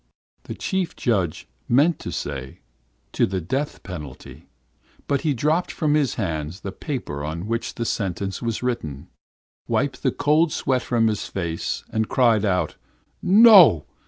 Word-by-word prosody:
"The - - -6
chief 190 -3 -2
judge 95 - -1 0.2
meant 145 +7 +3
to - - -6
say 65 -2 -6 0.5
'to - - +2
the 95 0 -2
death 135 - -3
penalty,' 75 -8 -9 0.6
but 140 -2 0
he 150 -4 0
dropped 155 +8 +1
from 150 -3 0
his 150 -5 +1
hands 80 -3 -3
the 100 - -5
paper 100 - -5
on 80 +4 -4
which 115 +2 -3
the 115 - -3
sentence 95 -2 -3
was 115 0 -3
written, 80 - -4 0.6
wiped 140 0 -1
the 130 - +1
cold 155 +4 +2
sweat 130 -3 0
from 120 -3 +1
his 105 -2 -1
face, 85 -3 -3
and 110 -1 -1
cried 115 -5 +3
out: 90 -5 0 0.4
"'No! 195 - +7
115 Hz, 150 wpm, -23 LUFS, 90-145 Hz, 0.6 s, No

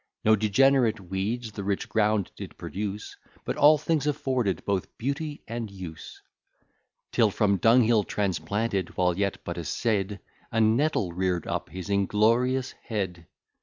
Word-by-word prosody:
No 110 0 +6
degenerate 115 +2 +3
weeds 100 +6 -3
the 100 - -6
rich 100 0 -1
ground 105 -3 +1
did - - -9
produce, 105 +1 -5 0.3
But - - -2
all 150 +2 +6
things 150 0 0
afforded 130 - -1
both 100 -3 -2
beauty 145 +4 -3
and 115 -1 -4
use: 90 -5 -9 0.9
Till 110 - +4
from 100 0 +2
dunghill 115 0 +4
transplanted, 100 0 -2
while 90 -1 +2
yet 100 +1 -1
but 85 0 -5
a - - -4
seed, 100 +1 -1 0.3
A 115 - 0
nettle 110 - +2
rear'd 90 -2 -1
up - - -3
his 90 -1 -7
inglorious 115 +6 +2
head. 95 -7 -4
105 Hz, 140 wpm, -27 LUFS, 95-120 Hz, 0.9 s, No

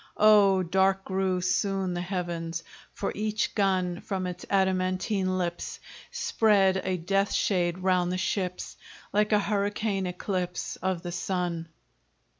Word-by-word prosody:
Oh, 205 -3 +6
dark 190 +2 +2
grew 190 -1 0
soon 190 0 0
the 175 - -2
heavens 170 -2 -3 0.3
For 200 - -3
each 215 +1 -1
gun 185 -3 +1
From 190 -2 -3
its 180 -1 -6
adamantine 185 0 +1
lips 175 -1 -3 0.3
Spread 195 -4 +2
a 185 -1 -1
death 195 +4 0
shade 175 -3 +1
round 180 -1 +1
the 185 - -1
ships, 185 -1 -2 0.4
Like 210 +1 +2
a 210 - +5
hurricane 205 -1 0
eclipse 180 0 -3
Of 185 -2 -2
the 175 - -4
sun. 175 -2 -2
185 Hz, 130 wpm, -27 LUFS, 180-195 Hz, 0.4 s, Oh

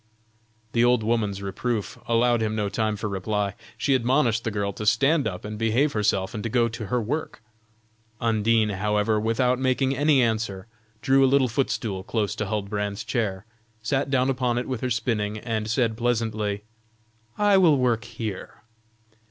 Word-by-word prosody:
The 115 +1 +2
old 120 -2 +3
woman's 105 -3 -1
reproof 105 +3 -3
allowed 120 0 +3
him 110 0 -1
no 105 -2 -1
time 110 +1 -1
for 105 +1 -4
reply. 100 0 -2 0.2
She 140 - +1
admonished 120 -2 +2
the - - -1
girl 100 -2 -2
to 105 - -6
stand 140 +3 +3
up 90 -2 -5
and 105 0 -6
behave 120 +6 +2
herself 100 -3 0
and 105 - -4
to 115 - -2
go 120 0 +2
to 110 -2 -6
her 125 +5 0
work. 125 +6 -3 0.8
Undine, 115 -1 +2
however, 105 +2 +1
without 125 +3 +1
making 130 +1 +1
any 145 -1 +4
answer 110 -4 -1 0.4
drew 135 0 +4
a 135 - +5
little 135 -1 +4
footstool 115 -5 -2
close 105 -1 -1
to 105 - -2
Huldbrand's 105 0 -3
chair, 105 -5 -2 0.4
sat 135 +4 0
down 130 -1 +2
upon 125 -2 0
it 125 - -2
with 130 -4 -3
her 130 - -1
spinning, 110 -3 -1
and 110 -1 -3
said 115 -1 +1
pleasantly: 110 -3 -1 0.7
"I 205 -2 +4
will 165 -6 +5
work 120 -4 +1
here." 110 -5 -7
115 Hz, 170 wpm, -25 LUFS, 105-125 Hz, 0.8 s, a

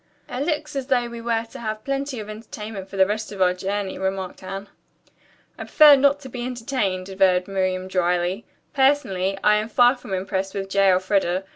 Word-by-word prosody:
"It 250 +2 -3
looks 300 -2 -2
as 270 -2 -3
though 245 -3 +1
we 235 0 -8
were 230 -1 -1
to - - -9
have 215 -1 -4
plenty 275 -2 -3
of 210 - -7
entertainment 215 -2 -8
for 195 - -8
the 190 - +6
rest 215 +2 -3
of 200 - -8
our 180 -1 +4
journey," 195 +1 -3
remarked 190 -1 -3
Anne. 195 +2 -6 0.9
"I - - -5
prefer 300 -2 +8
not 280 +1 +3
to 265 - -9
be 245 -1 -6
entertained," 235 -7 -2
averred 185 -2 +2
Miriam 185 -1 -1
dryly. 180 +2 0 0.3
"Personally, 255 -10 +1
I 210 0 +5
am 215 +1 -2
far 245 +3 +5
from 210 -6 -5
impressed 190 0 -3
with 195 -1 -4
J. 195 0 +4
Elfreda. 185 0 +1
205 Hz, 190 wpm, -23 LUFS, 190-245 Hz, 0.9 s, prefer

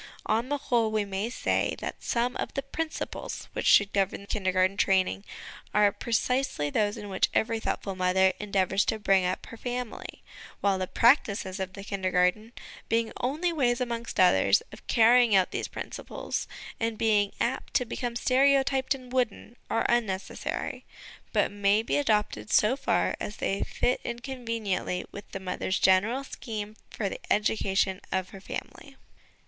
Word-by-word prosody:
On 235 +4 0
the 290 - 0
whole, 240 -5 +1
we 215 -1 0
may 200 +3 -3
say 245 - 0
that - - -6
some 245 +1 0
of - - -4
the 275 - -1
principles 315 +4 -5
which - - -2
should 200 -1 +5
govern 200 0 0
Kindergarten 190 -2 +1
training 185 - +2 0.5
are 210 -1 +5
pre 235 - -8
cisely 230 - +1
those 205 +2 +1
in 205 - -7
which 190 -1 +1
every 225 0 +1
thoughtful 200 -2 -2
mother 185 +1 +3
en 210 -1 -7
deavours 190 0 +2
to 220 - +1
bring 195 -3 +3
up 185 - -3
her 230 - -10
family; 245 0 -5 0.4
while 195 -2 +1
the 185 - -2
practices 210 -6 +2
of 190 -1 -4
the 195 - -8
Kindergarten, 190 +2 0 0.4
being 230 0 +1
only 310 +8 -1
ways, 245 -6 +1
amongst 235 -2 -3
others, 100 - +5
of - - -14
carrying 235 -1 +5
out 190 -1 +3
these - - -3
principles, - - -5 0.3
and 225 -1 -1
being 210 -3 +2
apt 260 +3 -2
to 250 - +3
become 240 0 -4
stereotyped 270 +1 +3
and 255 -1 -12
wooden, 240 -2 -1
are 230 - +1
unnecessary, 215 -6 -2 0.5
but - - +2
may 205 +1 +2
be - - 0
adopted 210 - 0
so 215 +5 +4
far - - +1
as 210 - -5
they 195 +1 -1
fit 250 - 0
in 235 - -4
conveniently 230 -8 -3
with 200 0 -10
the 195 - -5
mother's 185 0 -2
general 210 +8 +3
scheme 215 -5 -6
for - - -3
the - - -5
education 195 -2 +1
of 185 -1 -1
her 195 - -11
family. - - -8
215 Hz, 165 wpm, -28 LUFS, 190-240 Hz, 0.5 s, should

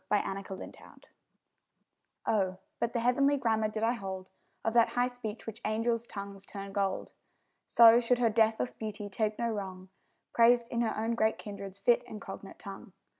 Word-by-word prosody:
_ 210 - +5 0.2
HER 195 - -5
PORTRAIT 190 0 -10 1.2
Oh, 190 -3 +1 0.2
but 235 - 0
the 235 - 0
heavenly 275 +4 +3
grammar 220 -4 +1
did 215 +1 -4
I 230 - +4
hold 190 -5 -5 0.3
Of 225 - +1
that 235 -1 +5
high 245 0 +3
speech 235 -3 -7
which 225 0 -7
angels' 230 +2 0
tongues 200 -1 -7
turn 195 -1 -7
gold! 195 -2 -1 0.6
So 235 0 +8
should 245 +1 +2
her 235 -2 +3
deathless 220 +2 +2
beauty 210 -1 -6
take 215 +1 -1
no 235 - 0
wrong, 190 -3 -6 0.4
Praised 235 0 +5
in 235 - -1
her 230 - 0
own 225 +2 0
great 220 -1 +2
kindred's 200 -2 -8
fit 235 +4 +3
and 215 - -7
cognate - - -9
tongue. - - -10
220 Hz, 175 wpm, -31 LUFS, 200-235 Hz, 1.2 s, So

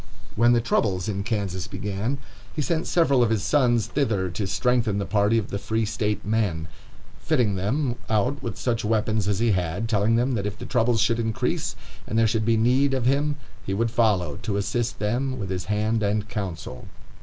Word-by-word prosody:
When 120 +2 +5
the 120 - +3
troubles 100 -5 0
in 100 -2 -2
Kansas 100 -4 -2
began, 105 +7 -3 0.4
he 150 - 0
sent 165 +2 -1
several 140 -7 +3
of 120 - +3
his 110 -3 0
sons 120 -2 +3
thither 110 -8 0
to 95 +3 -3
strengthen 120 -1 +1
the 100 - -1
party 105 +3 +2
of 110 - -1
the 100 - -3
Free 110 +2 -1
State 105 -1 -2
men, 100 -7 0 0.5
fitting 125 -10 +1
them 120 +7 -1
out 120 +6 +1
with 115 -6 -5
such 120 -3 -1
weapons 110 -1 +1
as 100 -2 +1
he 115 +1 +2
had; 90 +3 -1
telling 110 0 +2
them 125 +3 +2
that 100 -3 -1
if 105 +1 -5
the 125 - -7
troubles 120 -2 +2
should 115 +2 +2
increase, 110 -2 -1 0.3
and 110 - -2
there 115 - +5
should 110 0 +1
be 115 0 +3
need 130 +4 +3
of 130 -2 -1
him, 145 +3 +2 0.3
he 95 - -2
would 115 +2 0
follow, 100 -11 +1
to 100 -2 -3
assist 115 +4 -1
them 125 +5 -1
with 100 -5 -4
his 90 -1 -3
hand 110 +3 0
and 105 0 0
counsel. 95 -11 -5
110 Hz, 200 wpm, -25 LUFS, 100-120 Hz, 0.5 s, When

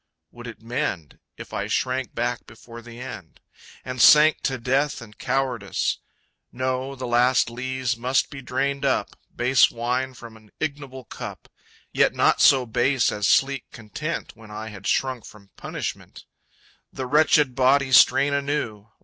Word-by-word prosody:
Would 120 0 -11
it 115 -1 -11
mend 100 - -4 0.2
If - - -11
I - - -3
shrank 130 0 -2
back 120 +1 -2
before 115 +1 -12
the 120 0 -12
end? 110 - -9 0.5
And 130 -1 -3
sank 155 +3 +7
to 135 -2 0
death 135 +5 0
and 105 -3 -13
cowardice? 125 -6 -2 0.5
No, 130 +2 -3
the 130 -1 -6
last 120 0 +2
lees 130 +1 -2
must 125 +3 0
be 135 - -8
drained 135 +2 -2
up, - - +1 0.3
Base 125 +1 +4
wine 125 +2 -2
from 115 -2 -12
an 110 -1 -21
ignoble 140 -4 -5
cup; - - -9 0.4
(Yet - - +2
not - - +3
so 130 -2 +6
base 125 +3 +1
as 105 -2 -1
sleek 135 -1 +2
content 120 +9 -6
When 110 -1 -15
I 110 +1 -7
had 100 -2 -9
shrunk 130 -4 0
from 100 -2 -15
punishment) - - -7 0.7
The 130 - -5
wretched 150 -1 +3
body 130 +1 +2
strain 140 +2 +5
anew! 140 -7 -2
125 Hz, 150 wpm, -23 LUFS, 115-135 Hz, 0.7 s, sank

